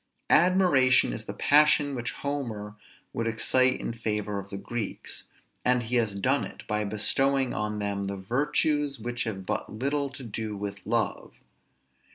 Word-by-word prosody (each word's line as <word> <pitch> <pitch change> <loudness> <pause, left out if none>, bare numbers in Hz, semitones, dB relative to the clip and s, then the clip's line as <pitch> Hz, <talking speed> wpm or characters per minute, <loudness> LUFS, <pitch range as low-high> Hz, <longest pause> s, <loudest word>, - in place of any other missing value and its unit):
Admiration 155 - +5
is - - -5
the - - -5
passion 150 -1 +4
which 120 -2 -3
Homer 115 -8 -4 0.4
would 115 - -2
excite 130 +3 +3
in - - -4
favor 105 -3 -2
of 100 0 -9
the 100 - -5
Greeks, 115 +1 -5 0.4
and 125 -1 +2
he 120 +2 0
has 110 -4 +1
done 100 - +1
it - - -8
by 105 0 0
bestowing 130 +6 +1
on 105 0 -2
them 100 -1 -2
the 100 0 -4
virtues 145 +6 0
which 120 +2 -3
have 95 -4 -4
but - - -3
little 140 +5 -1
to 135 0 -10
do 110 -2 -5
with 100 0 -6
love. - - -1
115 Hz, 160 wpm, -27 LUFS, 105-135 Hz, 0.4 s, Admiration